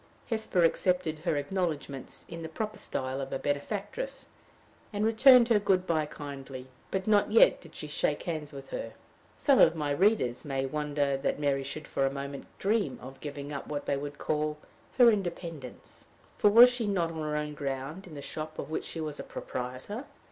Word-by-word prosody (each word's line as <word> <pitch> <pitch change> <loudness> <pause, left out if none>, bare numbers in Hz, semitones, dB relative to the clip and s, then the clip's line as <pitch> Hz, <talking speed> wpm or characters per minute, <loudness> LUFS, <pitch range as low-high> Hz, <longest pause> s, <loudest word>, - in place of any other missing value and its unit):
Hesper 220 -6 0
accepted 165 -1 +1
her 165 -2 0
acknowledgments 145 -4 -3
in 165 - -7
the 160 - -5
proper 215 +6 -4
style 130 +1 -3
of 135 - -5
a - - -1
benefactress, 205 - -3 0.6
and 210 0 0
returned 240 +2 +7
her 220 -3 +5
good 190 -2 +2
by 155 -3 +1
kindly. 135 -3 -8 0.2
But 190 0 -2
not 210 -1 +3
yet 225 - +6
did 165 - -15
she 150 - -5
shake 150 0 0
hands 155 -4 -4
with 140 -2 -10
her. - - -4 0.4
Some 275 -3 +4
of 165 - +7
my 150 -2 -1
readers 175 - +2
may 135 -2 -1
wonder 145 -1 0
that 135 - -1
Mary 140 -2 +1
should 150 +3 -6
for 135 - -1
a - - -1
moment 140 0 -6
dream 210 +1 0
of 135 +2 -10
giving 145 0 -6
up 140 - -5
what 145 -1 -4
they - - +1
would 145 +1 -5
call 150 0 -1 0.4
her 245 -2 +8
independence; 170 - -5 0.3
for 210 - +4
was 240 +4 +9
she 240 -3 -1
not 175 -5 +1
on 160 -1 -5
her 150 0 -1
own 150 0 -3
ground 140 +5 -4
in 160 - -10
the 140 - -7
shop 155 0 -5
of - - -5
which - - -2
she 165 - -5
was 150 -2 -3
a - - -4
proprietor? 130 - -5
155 Hz, 190 wpm, -30 LUFS, 140-195 Hz, 0.6 s, was